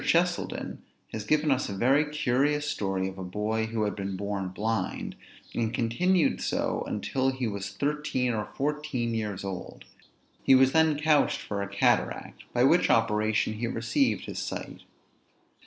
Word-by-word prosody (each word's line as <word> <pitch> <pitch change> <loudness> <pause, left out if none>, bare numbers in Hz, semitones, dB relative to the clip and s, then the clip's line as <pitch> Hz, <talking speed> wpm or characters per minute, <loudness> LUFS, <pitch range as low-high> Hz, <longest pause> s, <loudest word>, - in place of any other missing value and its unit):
Cheselden - - 0 0.3
has 110 - -3
given 150 +5 +2
us 130 -3 +1
a 100 - -4
very 135 +7 +4
curious 150 0 +1
story 95 -7 -1
of 95 0 -7
a - - -4
boy 105 +4 -1
who 110 -1 -1
had 105 - -1
been 100 -2 -4
born 100 -1 -2
blind, 105 +1 -2 0.4
and 115 -1 0
continued 165 +11 +2
so - - -1
until 135 0 0
he 130 -1 -2
was 100 -1 -4
thirteen 130 +1 -1
or 105 -1 -2
fourteen 145 -5 -1
years 105 -4 -3
old; 95 -2 -6 0.6
he 135 - +6
was 130 0 +5
then 160 -1 +3
couched 150 -1 +3
for 100 -1 -3
a 100 - -2
cataract, 100 0 0
by 120 - +2
which 165 +7 +4
operation 110 -1 +2
he 115 +2 -3
received 120 - 0
his - - -5
sight. - - -5
115 Hz, 155 wpm, -28 LUFS, 105-145 Hz, 0.6 s, he